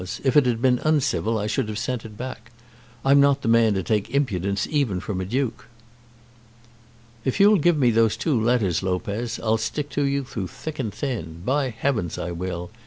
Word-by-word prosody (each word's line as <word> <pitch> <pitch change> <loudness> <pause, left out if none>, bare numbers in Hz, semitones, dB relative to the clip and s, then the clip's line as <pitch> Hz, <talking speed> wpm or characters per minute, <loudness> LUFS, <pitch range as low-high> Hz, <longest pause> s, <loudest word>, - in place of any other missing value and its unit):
If 130 -2 +1
it 145 -4 +6
had 120 0 -1
been 125 -2 +4
uncivil 140 -7 +1
I 105 - -2
should 110 +3 -1
have 105 - -4
sent 115 +1 -3
it 105 -2 -10
back. 120 -2 -7 0.6
I'm 140 +1 +6
not 140 0 +3
the - - -2
man 115 -2 +4
to 95 - -1
take 105 -1 0
impudence 100 -8 0
even 135 -12 +1
from 95 0 -4
a - - -3
duke." 125 +4 -2 1.6
"If 130 +7 -1
you'll 205 0 +6
give 170 +1 +3
me 125 -4 +4
those 115 -1 +2
two 140 -9 0
letters, 110 -7 +1
Lopez, 100 +5 -2
I'll 110 0 +2
stick 145 +3 -3
to 145 - 0
you 140 0 0
through 105 -7 -5
thick 155 - -8
and 115 -5 -2
thin. 85 - -5
By 135 +1 +1
heavens 115 - -2
I 90 - -4
will! 90 +1 -5
115 Hz, 195 wpm, -24 LUFS, 105-140 Hz, 1.6 s, it